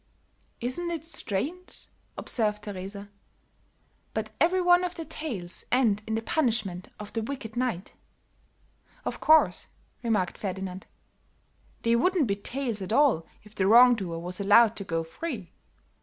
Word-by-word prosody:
"Isn't 255 +9 -3
it 330 -2 -4
strange," 325 - -4 0.3
observed 210 -3 -1
Teresa, 200 0 -7 1.0
"but 215 0 -2
every 355 +4 +4
one 355 0 +5
of 360 0 -3
the 330 - -5
tales 210 - -5
end 230 -5 +3
in 220 - -1
the 225 - -2
punishment 220 - 0
of 210 0 -8
the 225 - -1
wicked 230 -2 -6
knight." 240 -7 -2 1.1
"Of - - -3
course," 315 0 +4 0.3
remarked 210 -7 0
Ferdinand. 190 -1 -5 1.0
"They 230 0 +3
wouldn't 360 +5 +3
be 200 -3 0
tales 235 +1 -4
at 190 - -5
all 235 - +3 0.2
if 210 0 -16
the 190 -3 +1
wrong 245 +3 +8
doer 185 -7 -3
was 180 +3 -5
allowed 220 +3 +6
to 200 - -4
go 165 -3 -2
free. 200 - -6
220 Hz, 140 wpm, -27 LUFS, 195-275 Hz, 1.1 s, wrong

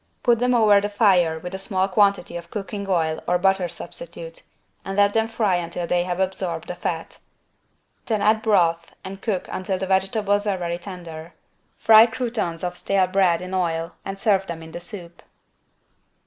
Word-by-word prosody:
Put 240 -3 +3
them 250 0 +2
over 210 -3 +5
the 205 - -2
fire 185 -6 +3
with 180 +3 -8
a 190 - -4
small 190 -1 0
quantity 200 -2 +2
of 170 0 -7
cooking 200 0 -5
oil 160 -4 0
or 180 - +3
butter 190 -1 +1
substitute, - - -9 0.4
and 195 0 -5
let 205 0 +4
them 225 0 +2
fry 215 -5 +1
until 170 0 -4
they 175 +1 0
have 180 0 -3
absorbed 185 -3 -2
the - - -4
fat. 165 -2 -5 0.9
Then 220 -3 0
add 215 +2 +3
broth 170 -6 +1
and 195 +1 -8
cook 200 -5 -2
until 185 0 -2
the 190 - -3
vegetables 200 +2 +1
are 195 -2 0
very 170 -1 -3
tender. 170 -3 -9 0.4
Fry 220 +1 +7
croutons 225 -8 -3
of 180 0 -3
stale 195 +1 +1
bread 180 -2 +2
in 185 +1 -7
oil 165 -2 -1
and 195 0 -5
serve 195 -2 +1
them 165 -1 -6
in 160 - -11
the 175 - -6
soup. 175 -1 -8
190 Hz, 180 wpm, -23 LUFS, 175-205 Hz, 0.9 s, Fry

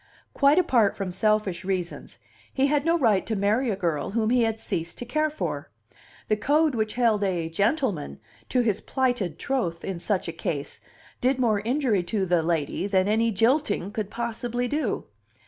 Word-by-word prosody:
Quite 280 +3 +4
apart 240 - +3
from 195 -3 -3
selfish 215 -2 +1
reasons, 185 -2 -4 0.3
he 265 - +2
had 290 +1 +1
no 335 +1 +3
right 220 - +3
to 220 - -1
marry 215 +6 +1
a 205 - 0
girl 165 -6 -1
whom 220 +1 0
he 250 0 +4
had 225 -1 +1
ceased 170 -5 -4
to 245 - -5
care 305 +5 0
for. 305 - -4 0.6
The 215 - +2
code 295 +7 +2
which 220 -2 -1
held 230 -4 +2
a 175 -4 -1
"gentleman" 200 - 0 0.3
to 250 - +2
his 215 -4 0
plighted 245 - -1
troth 200 -12 -2
in 190 -3 -4
such 185 +1 -1
a - - -2
case 155 -3 -4 0.4
did 255 +1 +2
more 225 -5 +2
injury 235 -2 +1
to 190 +3 -1
the 175 -2 +2
"lady" 160 +2 -1
than 190 -1 +2
any 225 +2 +2
"jilting" 225 - +1
could 210 -3 -3
possibly 235 +1 -3
do. 300 +5 -1
215 Hz, 180 wpm, -26 LUFS, 185-250 Hz, 0.6 s, Quite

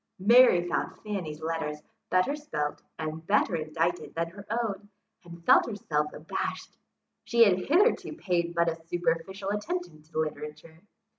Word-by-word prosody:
Mary 205 -3 +6
found - - -2
Fanny's 175 -8 -4
letters 160 -2 -2 0.3
better 185 +11 +2
spelt 290 - -3 0.2
and 155 0 -4
better 200 -3 +3
indited 165 +2 -2
than 165 0 -1
her 200 +2 -12
own, 215 -3 -2 0.3
and 170 -1 -12
felt - - +6
herself 150 -8 -1
abashed. 155 - -5 0.5
She 235 -1 +5
had 190 -4 +4
hitherto 355 - +2
paid 175 - -1
but 170 0 +3
a 165 0 -2
superficial 175 +3 -1
attention 255 - -4
to 155 +1 -11
literature. 155 +1 -4
175 Hz, 140 wpm, -28 LUFS, 160-205 Hz, 0.5 s, Mary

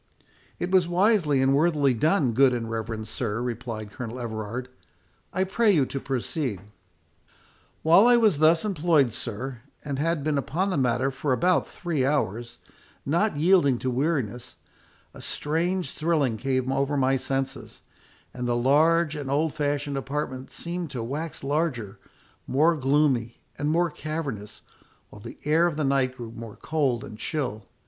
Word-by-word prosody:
"It 175 - -3
was 185 -2 +4
wisely 175 -7 +3
and 135 +1 +3
worthily 145 -3 +3
done, 150 - +2
good 130 +2 +4
and 115 -1 -3
reverend 110 -1 -4
sir," 110 0 -3
replied 115 -3 -5
Colonel 120 +2 -6
Everard. 115 +1 -4 0.6
"I 185 - +1
pray 210 +4 +2
you 150 -8 +3
to 135 - -4
proceed." 130 - -3 1.2
"While 170 +8 +6
I 245 0 +6
was 215 -10 +3
thus 160 +4 +4
employed, 160 - +2
sir, 120 +2 -5 0.2
and 140 -2 -3
had 160 -1 0
been 150 -1 +1
upon 185 +8 -1
the - - 0
matter 130 0 +1
for 135 +1 -1
about 180 +7 +2
three 165 -7 -2
hours, 120 -4 -1 0.5
not 170 +4 +1
yielding 155 -5 +4
to 130 +1 -2
weariness, 125 -4 -2 0.6
a - - -11
strange 175 +4 -1
thrilling 155 -7 0
came 130 +2 -1
over 140 +2 0
my 135 0 +3
senses, 135 0 -3 0.5
and 125 -1 -4
the 120 - +1
large 155 +5 +3
and 145 -3 -5
old 150 +3 +1
fashioned 145 -1 -1
apartment 135 -1 -4
seemed 170 -1 -5
to 125 -4 -4
wax 150 +7 -5
larger, 135 -8 -2 0.5
more 155 +5 +3
gloomy, 135 -4 +1 0.2
and 145 +1 -2
more 170 +1 +2
cavernous, 140 -12 -5 0.5
while 105 - -12
the - - -9
air 160 +3 +4
of 170 - -3
the 155 - -1
night 135 -2 +1
grew 115 -2 -7
more 115 -2 -9
cold 140 -7 -1
and 105 - -10
chill. 125 -10 -3
140 Hz, 155 wpm, -26 LUFS, 125-160 Hz, 1.2 s, While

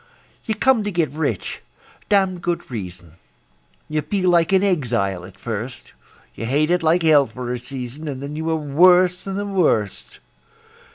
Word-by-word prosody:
You 220 - -1
come 250 0 +3
to 205 - -2
get 170 -4 0
rich 145 - -3 0.5
(damned 190 -3 +2
good 175 -6 -3
reason); 90 -6 -8 0.7
You 155 0 -1
feel 185 +3 0
like 170 0 +3
an 190 0 +4
exile 115 - 0
at 95 0 -14
first; 120 +4 -6 0.4
You 115 - -5
hate 150 +6 +1
it 180 0 +2
like 165 +2 +2
hell 150 -4 +5
for 125 +2 -5
a 125 - -4
season, 130 +4 -7
And 135 -3 -4
then 140 +2 -6
you 160 +1 -3
are 160 - +1
worse 180 +5 +4
than 195 -1 -4
the 205 +1 -2
worst. 165 - 0
155 Hz, 170 wpm, -21 LUFS, 125-180 Hz, 0.7 s, hell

